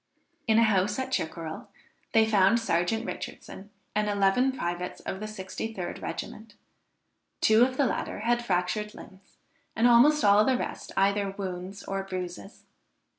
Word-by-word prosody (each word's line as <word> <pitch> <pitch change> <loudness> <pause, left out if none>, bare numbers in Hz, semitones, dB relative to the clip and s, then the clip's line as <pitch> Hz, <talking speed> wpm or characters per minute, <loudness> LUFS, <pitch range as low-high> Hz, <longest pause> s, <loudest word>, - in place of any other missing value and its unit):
In 220 -1 +4
a 230 - +6
house 205 -1 +2
at 260 0 -3
Chickerell, 160 -6 -4 0.4
they 225 -1 +5
found 215 +1 +4
Serjeant 220 +2 0
Richardson 200 -4 -8 0.2
and 210 0 0
eleven 205 +6 +2
privates 175 -7 -4
of 190 - -5
the 215 - -5
63d 195 -1 -6
regiment; 215 -1 -7 0.8
two 220 +2 +5
of 255 +1 0
the 280 - +3
latter 210 - -3
had 240 +2 +1
fractured 210 +1 -1
limbs, 190 +1 -15 0.4
and 230 +2 +4
almost 245 +3 +5
all 205 +1 +6
the 260 +2 +2
rest - - -5
either 200 0 +1
wounds 190 0 -6
or 195 0 -3
bruises. 185 +1 -7
205 Hz, 145 wpm, -27 LUFS, 190-225 Hz, 0.8 s, a